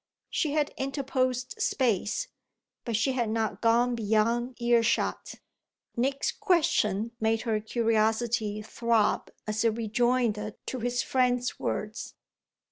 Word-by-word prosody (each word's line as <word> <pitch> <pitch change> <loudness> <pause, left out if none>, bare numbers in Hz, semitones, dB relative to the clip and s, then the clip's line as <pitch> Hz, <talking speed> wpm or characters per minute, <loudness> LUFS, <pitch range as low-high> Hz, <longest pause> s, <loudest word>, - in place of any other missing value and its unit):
She 300 -4 0
had 300 -1 0
interposed 260 -2 -2
space, 240 - 0 0.6
but 235 -3 -1
she 230 +5 +2
had 240 -4 -1
not 220 0 -1
gone 240 +2 +3
beyond 230 +3 0
ear 235 -1 +4
shot. 230 0 -1 0.6
Nick's 270 +3 0
question 305 - +1
made 220 0 +1
her 225 -3 0
curiosity 220 -1 0
throb 230 0 +1 0.2
as 215 +1 -1
a 230 - +5
rejoinder 225 -1 0
to 255 - -4
his 245 +1 -1
friend's 250 -1 +1
words. 215 +2 -4
235 Hz, 120 wpm, -28 LUFS, 220-255 Hz, 0.6 s, a